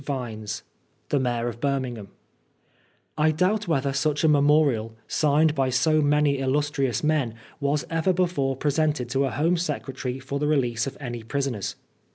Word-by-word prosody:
Vines 115 -7 -4 0.5
The 145 - +2
Mayor 120 -2 -1
of 120 -1 -5
Birmingham 130 -7 -2 1.1
I 155 +1 +4
doubt 185 +7 +1
whether 140 -4 0
such 150 +2 0
a - - +5
memorial, 145 -6 +3
signed 150 +1 +3
by 135 -3 +1
so 155 +5 +3
many 145 -1 +2
illnstrious 135 -1 0
men, 145 -7 +1 0.2
was 140 0 0
ever 165 +2 +1
before 175 -7 0
presented 145 -2 0
to 135 +2 +2
a - - 0
Home 160 +7 +1
Secretary 135 -6 -3
for 135 +2 -4
the 150 - 0
release 125 -5 +1
of 135 - -6
any 120 -4 -5
prisoners. 120 -3 -3
140 Hz, 155 wpm, -25 LUFS, 130-150 Hz, 1.1 s, a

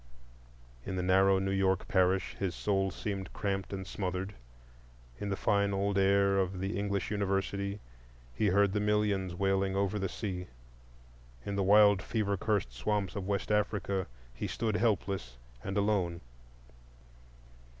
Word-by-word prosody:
In 95 - -4
the 90 - -1
narrow 95 +1 +4
New 95 0 -1
York 95 -1 +1
parish 95 -2 +2
his 95 -3 -1
soul 95 -2 +1
seemed 95 -1 -4
cramped 95 -2 -2
and 95 -1 -4
smothered. 95 +1 -3 0.9
In 105 - -3
the 100 - 0
fine 100 -1 +2
old 100 +1 0
air 100 0 +4
of 95 0 -1
the 95 +3 -2
English 100 0 -2
University 100 0 -1 0.5
he 105 - +1
heard 100 0 +3
the 105 - +1
millions 105 -3 +1
wailing 95 +1 +1
over 100 +1 0
the 95 -1 -1
sea. 90 -4 -4 1.0
In 100 - -3
the 100 - +1
wild 100 0 +6
fever 100 -2 -1
cursed 100 - -1
swamps 100 - -1
of 95 -2 -4
West 100 +1 -1
Africa 100 -2 0 0.3
he - - -4
stood 110 -2 -1
helpless 100 - -1 0.3
and 95 +1 -3
alone. 100 -5 +1
100 Hz, 145 wpm, -31 LUFS, 95-100 Hz, 1.0 s, wild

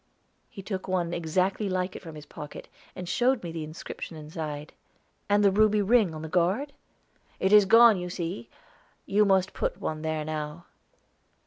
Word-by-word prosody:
He 195 - -10
took 190 -1 -5
one 175 -2 -1
exactly 185 +5 0
like 185 0 -2
it - - -7
from 165 -3 -10
his 150 -1 -10
pocket, 150 0 -9 0.3
and 180 - -6
showed 245 +5 +1
me 170 - -5
the 165 -1 -5
inscription 155 +1 -8
inside. 150 -1 -6 0.6
"And 205 0 +4
the 200 - +5
ruby 210 +1 +3
ring, 205 -5 +3
on 155 - -7
the - - -4
guard?" 185 - 0 0.7
"It 190 +2 +2
is 210 -1 +8
gone, 230 +1 +7
you 180 0 -5
see; 165 -10 -5 0.6
you 210 +2 +3
must 190 -2 +2
put - - -2
one 155 -1 -3
there 155 -1 -2
now." 155 +1 -5
180 Hz, 175 wpm, -27 LUFS, 160-205 Hz, 0.7 s, is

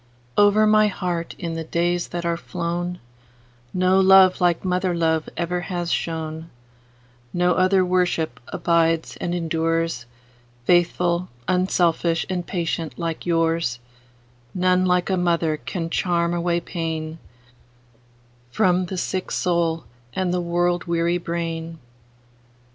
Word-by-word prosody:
Over 205 +1 +5
my 215 0 +5
heart, 175 -4 -3
in 170 -3 -4
the 165 0 -4
days 175 +2 0
that 175 0 -5
are 170 0 +1
flown, 175 0 -3 0.7
No 185 +1 +3
love 190 -1 +6
like 175 0 +2
mother 180 -1 0
love 160 -2 0
ever 175 +1 -1
has 175 0 -3
shone; 160 0 -3 0.8
No 180 0 +2
other 185 +1 +3
worship 175 -8 0
abides 165 -1 +1
and 175 0 -2
endures,—Faithful, 165 +1 -1 0.2
unselfish, 175 -2 +1
and 180 -2 -3
patient 165 -2 -3
like 165 0 -4
yours:None 125 +1 -1
like 180 +1 +1
a 190 - +2
mother 170 -3 +1
can 165 +1 -4
charm 170 -1 +1
away 175 0 0
painFrom 160 -2 -4 1.7
the 190 - -5
sick 185 +1 -2
soul 170 -2 0 0.3
and 185 -2 0
the 180 - 0
world 175 +1 0
weary 170 0 +1
brain. 165 -1 -4
170 Hz, 115 wpm, -23 LUFS, 165-180 Hz, 1.7 s, love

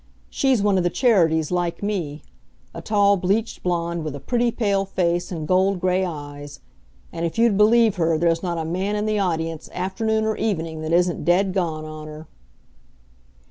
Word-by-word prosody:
She's 260 -6 +1
one 200 -2 +3
of - - 0
the 175 - +2
Charities, 170 - +2
like 175 +1 -2
me 170 -8 -3 0.5
a - - -7
tall 200 -1 +3
bleached 200 +5 -1
blonde 170 -2 -2
with 155 -2 -4
a - - -6
pretty, 240 - 0
pale 205 -4 0
face 175 -2 -1
and 160 -4 -4
gold 190 +1 +2
gray 185 +1 +1
eyes. 145 -4 -7 0.5
And, 165 0 -4
if 170 +3 -3
you'd 230 -2 +4
believe 215 0 +4
her, 165 -2 +2
there's 165 0 +1
not 175 -2 -2
a 160 - -3
man 185 +5 -2
in 210 0 -1
the 215 -1 0
audience, 165 -4 -2
afternoon 220 +4 -1
or 220 0 0
evening, 165 -7 -2
that 155 0 -4
isn't 175 -1 +1
dead 185 +4 +2
gone 165 -5 -2
on 155 0 -8
her. 155 +1 -10
180 Hz, 180 wpm, -22 LUFS, 160-205 Hz, 0.5 s, you'd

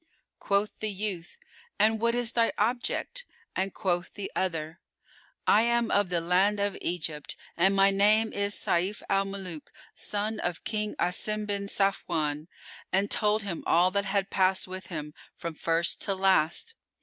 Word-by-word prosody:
Quoth 200 +1 0
the 215 - -1
youth, 195 - -3 0.4
"And 220 +1 +3
what 235 0 +2
is 240 -1 +1
thy 230 -1 +2
object?"; 245 - -1 0.3
and 190 +1 0
quoth 180 -3 -2
the 200 -2 -5
other, 165 -2 -2 0.7
"I 210 - +5
am 235 0 +1
of 205 -2 +2
the 175 -1 +1
land 185 +5 +2
of 200 -1 0
Egypt 160 -4 -3 0.2
and 190 +3 +3
my 195 0 +5
name 215 +3 +3
is 200 0 0
Sayf 185 +5 0
al 195 0 +3
Muluk 190 -6 -6 0.2
son 210 +1 -1
of 175 -2 -3
King 210 -1 -2
Asim 210 +4 -1
bin 200 -1 -3
Safwan"; 165 -7 0 0.4
and 195 +2 +1
told 215 0 +2
him 185 -5 -5
all 175 +2 +4
that 200 +1 0
had 195 0 0
passed 190 -1 +2
with 185 +1 -7
him, 150 -3 -6 0.2
from 170 -1 -5
first 165 +2 0
to 195 - 0
last. 190 - +2
195 Hz, 160 wpm, -28 LUFS, 175-210 Hz, 0.7 s, I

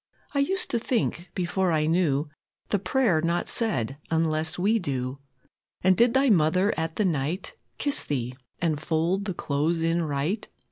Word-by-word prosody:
I 280 - +1
used 370 +7 +1
to 235 - +1
think, 220 -7 -1
before 180 +1 0
I 155 -1 +2
knew, 155 -3 +1 0.4
The 205 - +1
prayer 190 -3 +2
not 170 +1 0
said 140 - 0
unless 160 -1 +1
we 210 +5 +2
do. 130 -5 -3 0.6
And 185 0 +5
did 235 +5 +3
Thy 270 +1 +4
Mother 185 +3 +3
at 160 0 -3
the 210 - +1
night 160 - -1 0.2
Kiss 285 -1 +2
Thee, 125 -3 -3 0.2
and 160 -4 0
fold 170 +5 0
the 190 -4 -3
clothes 160 +4 0
in 165 +1 +1
right? 155 +7 -2
170 Hz, 160 wpm, -26 LUFS, 155-200 Hz, 0.6 s, And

